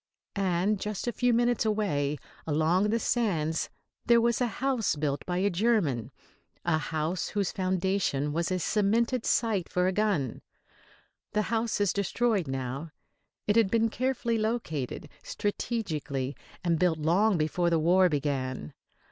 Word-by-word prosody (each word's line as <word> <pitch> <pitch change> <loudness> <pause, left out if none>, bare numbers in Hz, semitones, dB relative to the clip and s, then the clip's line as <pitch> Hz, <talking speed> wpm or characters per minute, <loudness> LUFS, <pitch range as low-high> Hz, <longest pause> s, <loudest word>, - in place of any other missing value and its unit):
And 195 +1 +1
just 210 -1 -4
a 240 - 0
few 245 +1 +1
minutes 240 0 +2
away 180 -10 0 0.3
along 160 +6 +2
the 225 - +2
sands 170 -10 0 0.3
there 235 0 +5
was 235 +1 +1
a 245 - +3
house 245 -1 0
built 145 -2 -2
by 180 -1 -1
a 200 +2 +2
German, 175 - +1 0.6
a 165 -2 +2
house 160 +3 -2
whose 200 -3 -1
foundation 185 -6 0
was 170 +1 0
a 185 - 0
cemented 225 +6 +1
site 215 -7 +1
for 180 0 +1
a 185 - +2
gun. 190 - 0 0.9
The 210 0 +2
house 225 -1 0
is 205 -2 +2
destroyed 200 - 0
now. 135 +4 -4 0.6
It 205 - +2
had 225 -4 +4
been 225 +1 +2
carefully 235 -1 -1
located, 165 - -2
strategically, 155 - -3 0.3
and 170 -2 +1
built 175 -2 +2
long 180 +6 +3
before 170 +3 +1
the 165 - +3
war 180 +3 +4
began. 135 - -2
185 Hz, 145 wpm, -28 LUFS, 155-220 Hz, 0.9 s, there